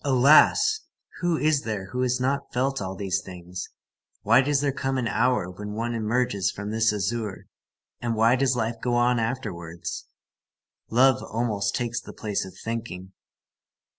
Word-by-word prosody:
Alas! 150 - +5 0.4
Who 175 -2 +1
is 150 -2 +2
there 105 -5 -4
who 125 - -2
has 125 0 +1
not 140 +2 -1
felt 135 +2 0
all 95 0 -4
these 95 -1 -1
things? 90 0 -8 0.5
Why 115 +5 +6
does 140 +1 +1
there 140 -1 +1
come 135 0 -2
an 125 -2 0
hour 120 -4 +1
when 105 +3 -7
one 115 +2 -2
emerges 110 -4 0
from 105 +1 -5
this 110 0 +2
azure, 105 0 -3 0.6
and 120 -1 -1
why 115 +3 +4
does 130 -1 +2
life 115 -1 -1
go 120 -1 0
on 120 0 +3
afterwards? 95 -9 -4 0.8
Loving 130 +2 +4
almost 105 -3 -1
takes 120 -2 -2
the - - -11
place 105 -3 -3
of 95 - -12
thinking. 110 -5 -5
115 Hz, 160 wpm, -25 LUFS, 105-130 Hz, 0.8 s, Why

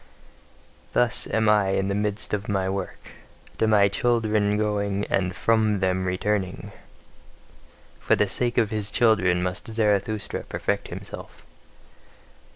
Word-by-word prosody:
Thus 120 -2 +2
am 110 0 +1
I 105 -2 +4
in 95 - 0
the 100 - -1
midst 105 +1 -3
of 105 +2 -2
my 95 -2 0
work, 95 -1 -5 0.5
to 110 - +3
my 105 -2 +5
children 105 -1 +1
going, 100 -1 -1
and 90 -2 0
from 110 -2 +2
them 95 0 0
returning: 95 +1 -2 1.3
for - - +2
the 105 - +2
sake 120 +5 -1
of 115 -2 +2
his 105 -2 -1
children 95 -7 +2
must 90 0 -4
Zarathustra 110 -1 -1
perfect - - -2
himself. - - -9
105 Hz, 130 wpm, -25 LUFS, 95-110 Hz, 1.3 s, my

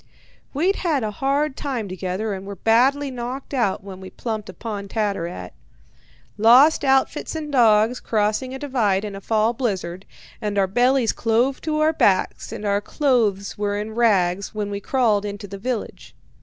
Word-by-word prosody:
"We'd 350 +8 +1
had 310 -8 0
a 215 - -2
hard 275 +5 0
time 250 -7 -3
together 190 +3 -3
and 190 -1 -6
were 200 - -6
badly 265 +8 +2
knocked 255 +3 -6
out 235 -8 0
when 190 -1 -9
we 190 - -9
plumped 220 -4 -5
upon 200 +2 -6
Tattarat. 195 - -3 0.9
Lost 255 +9 +6
outfits 270 +3 +1
and 305 -2 -5
dogs 230 -2 +4
crossing 215 +4 -1
a - - -4
divide 225 -8 0
in 205 -1 -6
a 195 - -8
fall 220 +2 +1
blizzard, 190 -7 -3 0.3
and 210 -1 -2
our 195 - +4
bellies 245 +4 +2
clove 240 +4 0
to 305 -1 -1
our 310 +1 +3
backs 190 -10 +1
and 210 - -6
our 200 0 +1
clothes 215 -8 0
were 205 0 -1
in 215 +1 -4
rags 200 -4 +1
when 205 -1 -3
we 200 - -3
crawled 220 -3 +1
into 205 0 -6
the 200 0 -8
village. 240 +1 -5
220 Hz, 170 wpm, -22 LUFS, 200-260 Hz, 0.9 s, Lost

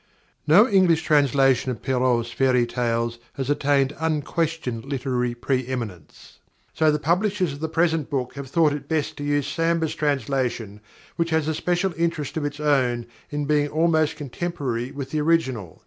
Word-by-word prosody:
_ - - +2
_No 205 +9 +8
English 185 -6 +3
translation 135 -3 +3
of 120 -4 -5
Perrault's 125 -3 +1
fairy 125 -1 +2
tales 115 -1 -1
has 135 +1 -2
attained 140 -1 +1
unquestioned 160 -5 -1
literary 125 -3 -2
pre 125 +1 -1
eminence. 110 - -7 0.3
So 155 -1 +3
the 150 - +1
publishers 180 +1 0
of 140 - -9
the 160 +1 -3
present 160 -2 +1
book 130 -4 -2
have 140 -1 -7
thought 155 0 +3
it 145 - -6
best 155 -3 -1
to 145 - -5
use 145 -1 0
Samber's 165 -1 0
translation, 130 -7 -2 0.4
which 170 -1 0
has 160 -2 +1
a 160 - +1
special 180 +3 0
interest 165 -3 -1
of 155 -2 -2
its 145 0 -4
own 130 -5 +1 0.2
in 145 0 -2
being 145 0 +2
almost 155 0 +2
contemporary 140 -5 -4
with 140 -2 -6
the 155 - 0
original. 130 - 0
145 Hz, 165 wpm, -24 LUFS, 125-160 Hz, 0.4 s, No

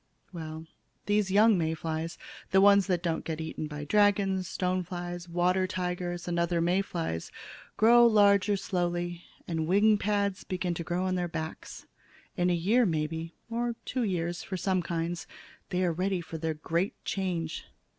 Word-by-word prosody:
"Well, 160 -1 -6 0.4
these 205 -1 +1
young 210 0 +5
May 160 0 0
flies 160 +1 -4 0.3
the 190 - +4
ones 200 0 +6
that 180 -3 0
don't 165 -2 -1
get 160 -1 -4
eaten 160 -1 -4
by 150 0 -6
dragons, 195 0 +2
stone 185 +1 -1
flies, 175 0 -6
water 180 +2 +2
tigers, 180 -1 -3
and 170 -1 0
other 170 0 +1
May 175 +3 +2
flies 165 - -4 0.5
grow 235 +2 +7
larger 205 -2 +4
slowly, 175 -2 -2 0.2
and 160 -2 -2
wing 205 +3 +4
pads 200 -2 0
begin 185 -1 -2
to 170 - -4
grow 175 +3 -1
on 185 - 0
their 180 -1 -1
backs. 160 -1 -6 0.5
In 180 -1 +1
a 175 - +3
year, 210 +9 +3
maybe, 160 -2 -2
or 235 0 -2
two 255 - -2
years 175 -4 -1
for 190 - -5
some 185 0 +1
kinds, 170 0 -3 0.4
they 180 0 0
are 170 - +1
ready 185 +2 0
for 165 -1 -7
their 160 0 -2
great 170 +5 -1
change. 175 -5 -2
180 Hz, 165 wpm, -29 LUFS, 165-195 Hz, 0.5 s, grow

